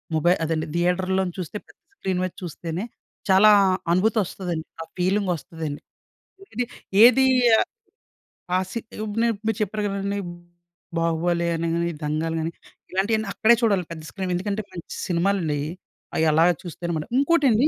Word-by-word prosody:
మొబై 170 +3 +4
అదండి. 160 -1 -1
థియేటర్‌‌లో 185 +2 +1
నించి 175 - -8
చూస్తే, 185 +3 -4
పెద్ద - - -21 0.2
స్క్రీన్ 190 - -2
మీద 185 - -2
చూస్తేనే, 170 +1 -5 0.5
చాలా 195 +3 +7 0.4
అనుభూతొస్తదండి. 185 -4 0 0.2
ఆ - - -3
ఫీలింగొస్తుదండి. 175 -5 -1 0.7
ఇది 245 +3 0 0.4
ఏది 260 +2 +7 0.4
ఆహ్, - - +1 0.9
ఆ - - +5
సి 230 - -2 0.2
ఇప్పుడు 215 0 -3
నే - - +4
ఇప్పుడు 215 +1 -8
మీరు 220 - -1
చెప్పారు 210 +1 -1
కదండి, 200 0 -2 0.8
'బాహుబలి' 170 +1 +1
అని 165 +1 -1
గాని, 170 0 0
'దంగల్' 155 +2 -1
గాని, 160 +1 -2 0.4
ఇలాంటియన్నీ 210 +3 +1
అక్కడే 235 +2 +5
చూడాలండి 200 -7 +1
పెద్ద 160 -1 -9
స్క్రీన్. 190 -2 -3
ఎందుకంటే, 200 +4 -2
మంచి 170 - -8
సినిమాలండీ 175 -3 +1
అయి. 145 +2 -3 0.5
అయి 160 - +2
అలాగ 165 +3 +5
చూస్తేనమాట. 170 -2 -4
ఇంకోటండి 280 -4 +4
180 Hz, 145 wpm, -24 LUFS, 165-205 Hz, 0.9 s, చాలా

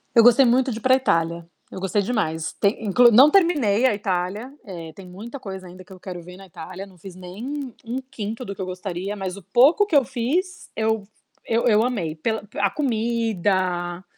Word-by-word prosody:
Eu 230 - +8
gostei 245 +3 +7
muito 255 +2 +3
de 220 - -4
ir - - -19
pra 260 0 +5
Itália, 170 -9 0 0.2
eu - - -7
gostei 195 +2 0
demais. 165 -8 -2
Tem 205 +2 0
inclu 240 +4 +5
não 265 +7 +8
terminei 285 - +3
a 255 - +4
Itália, 200 +5 -3
eh, 170 -4 -8
tem 195 - -11
muita 225 +9 -9
coisa 190 -3 -8
ainda 185 +1 -12
que 185 - -21
eu 185 - -14
quero 180 -2 -7
ver 180 +1 -12
na 195 - -12
Itália, 185 +3 -9
não 185 - -18
fiz 180 +2 -11
nem 240 +9 -6
1/5 245 -2 -5
do 200 - -6
que - - -7
eu 185 - -2
gostaria, 185 +2 -5
mas 190 -1 -5
o 195 - -11
pouco 270 - +4
que 325 - -1
eu 275 - +6
fiz, 275 +10 -2
eu 220 -1 0 0.4
eu 230 +2 +1
eu 215 -1 +4
amei. 190 -11 -2
Pela 220 +7 -2
a 200 -1 +2
comida, 200 - -1
205 Hz, 205 wpm, -23 LUFS, 185-245 Hz, 0.4 s, Eu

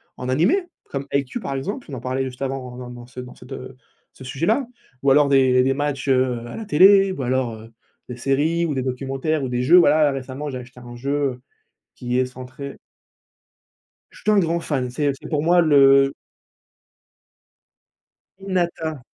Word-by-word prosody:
en 125 - -6
animé 200 - +2 0.2
comme 140 0 -5
Haikyu, 140 - -2
par 140 -9 -4
exemple, 200 - -5
on 135 - -5
en - - -6
parlait 130 +2 -2
juste 130 0 -6
avant 135 0 -2 0.2
dans 125 -1 -8
dans 120 0 -10 0.2
dans 125 - -11
cette, 125 +2 -15
heu, 130 0 -8 0.4
ce 130 - -13
sujet-là. 185 - 0 0.3
Ou 140 - +2
alors 145 +1 +5
des 130 -2 +4
des 135 +1 +2
matchs, 145 -1 -3
heu, 130 -3 +1
à - - -8
la 220 - -6
télé 195 +4 +6
ou 140 -8 -4
alors, 125 -2 -1
heu, 115 +1 -13 0.4
des 125 - -5
séries, 150 +7 0
ou 150 - -2
des 130 - -1
documentaires, 135 +4 -2
ou 130 - -2
des 125 0 -1
jeux. 170 +8 +6
Voilà 155 -3 +5
récemment, 135 +2 -5
j'ai 130 - -5
acheté 125 0 -13
un 120 -1 -11
jeu, 135 +4 -5 0.2
heu, 125 - -15 0.5
qui 125 0 -2
est 130 - +2
centré 130 +2 -9 1.3
Je - - -16
suis 215 - +1
un 210 - +4
grand 170 -2 +1
fan, 130 -6 -2
c'est 145 +2 0
c'est - - -9
pour 150 -2 0
moi 175 +2 +4
le 140 -3 +5 2.3
Hinata. 170 -5 -2
135 Hz, 185 wpm, -22 LUFS, 130-155 Hz, 2.3 s, télé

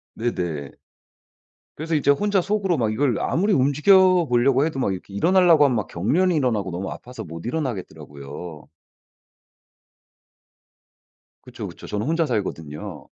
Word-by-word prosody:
네네. 85 - -3 1.0
그래서 160 +1 -2
이제 140 -1 +3
혼자 205 +5 +1
속으로 195 -3 0
막 110 -3 0
이걸 130 -1 0
아무리 200 +6 0
움직여 175 +5 +4
보려고 125 +3 +3
해도 155 -4 -3
막 100 -7 0
이렇게 95 +2 -9
일어나려고 170 - +4
하면 130 - +2
막 105 - -2
경련이 165 - +1
일어나고 115 - 0
너무 90 +3 -4
아파서 125 +1 -9
못 85 +3 -9
일어나겠더라고요. 80 - -6 2.8
그쵸, - - -8
그쵸. - - -11
저는 105 +4 -3
혼자 165 +1 +1
살거든요. 85 - -5
125 Hz, 325 characters per minute, -23 LUFS, -, 2.8 s, 움직여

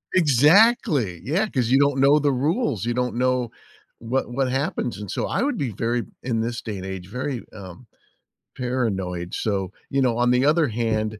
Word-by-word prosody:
Exactly! 150 - +4
Yeah, 185 - 0
'cause 125 - -1
you 135 +2 +4
don't 140 -1 +2
know 140 +2 +5
the 145 -1 +2
rules. 140 - 0
You 120 - 0
don't 125 0 -1
know 125 -1 0 0.5
what 120 +2 -2
what 130 0 0
happens, 135 -2 -2
and 105 -2 -8
so - - -2
I - - -1
would 280 -4 -1
be 135 - -2
very 115 +4 -1 0.2
in 120 -3 -1
this 115 +1 -3
day 105 -3 -5
and 95 - -7
age, 95 -2 -6
very, 125 +2 -4
um, 100 +5 -11 0.7
paranoid, 95 -9 -2
so, 95 -4 -2 0.2
you 135 - +1
know, 120 -3 +1
on 120 0 +3
the 125 +2 +3
other 155 0 +3
hand, 110 -2 -2
125 Hz, 190 wpm, -23 LUFS, 110-140 Hz, 0.7 s, know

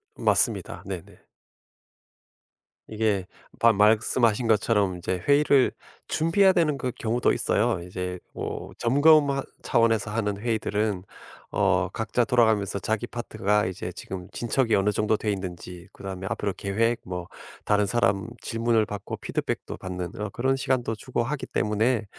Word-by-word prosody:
맞습니다. - - +1
네네. 95 -3 -8 1.6
이게 105 -4 0 0.3
바 115 -1 +6
말씀하신 110 +2 +3
것처럼 105 -4 +2
이제 90 +1 -3
회의를 140 -2 +4 0.4
준비해야 190 +4 +3
되는 160 -5 +2
그 130 -2 -2
경우도 115 +2 +1
있어요. - - +1
이제 90 0 -4 0.2
뭐 - - -5
점검 145 +4 +5
하 135 0 -1 0.2
차원에서 115 -2 +2
하는 105 -2 -1
회의들은 105 -3 -1 0.5
어 95 -3 +2
각자 120 +2 0
돌아가면서 110 -6 +2
자기 110 +3 -2
파트가 105 -4 0
이제 90 -1 -5
지금 90 0 -7
진척이 120 0 +1
어느 100 +1 +2
정도 105 +1 +1
돼 105 - -1
있는지 90 -1 -6
그다음에 95 -1 -6
앞으로 100 -2 -2
계획 115 +5 0
뭐 90 -1 -5 0.4
다른 105 0 +3
사람 100 -2 +1
질문을 115 -1 +1
받고 105 -3 -6
피드백도 - - -4
받는 90 -1 -5
어 105 -1 -3
그런 130 +5 0
시간도 130 -4 -1
주고 120 +2 -2
하기 140 +3 -3
때문에 110 +2 0
110 Hz, 315 characters per minute, -26 LUFS, 100-120 Hz, 1.6 s, 바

